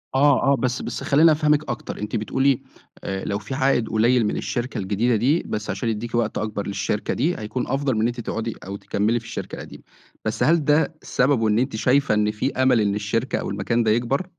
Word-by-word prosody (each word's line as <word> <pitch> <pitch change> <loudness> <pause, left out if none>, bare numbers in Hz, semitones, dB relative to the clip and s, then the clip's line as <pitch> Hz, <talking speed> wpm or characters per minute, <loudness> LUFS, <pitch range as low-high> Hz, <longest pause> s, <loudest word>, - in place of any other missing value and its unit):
آه، 140 0 +4
آه. - - +5
بس 125 -1 -1
بس - - -5
خلّيني 155 +3 +5
أفهمِك 150 -1 +2
أكتر، 120 - -5
أنتِ 105 +2 -4
بتقولي 130 +4 +1 0.4
آآ 95 0 -4
لو 100 +1 -1
في 110 +5 -7
عائِد 130 -4 +1
قليِّل 115 +1 +3
من 105 - -1
الشركة 125 0 -3
الجديدة 105 +5 +1
دي، 135 +10 +2
بس 105 0 -4
عشان 100 +4 -2
يدّيكِ 115 +2 -3
وقت 120 -2 0
أكبر 105 -2 -3
للشركة 100 +1 -2
دي، 160 +8 0
هيكون 110 +4 -3
أفضل 135 -2 0
من 110 - 0
إن 115 - +3
أنتِ 120 0 -4
تقعُدي 115 0 -3
أو 100 +1 -5
تكمّلي 110 +4 0
في 115 - -16
الشركة 115 - -6
القديمة. - - -10 0.4
بس 110 - -1
هل 160 -2 +3
ده 155 +2 +2
سببه 125 -4 +1
إن 105 +2 +2
أنتِ 130 -3 -1
شايفة 135 +2 +2
إن 105 0 +2
في 130 +6 -2
أمَل 130 -3 +3
إن 100 -1 +1
الشركة 115 +5 -1
أو - - -4
المكان 105 +4 0
ده 110 - +2
يكبر؟ 125 +10 0
120 Hz, 215 wpm, -23 LUFS, 105-135 Hz, 0.4 s, آه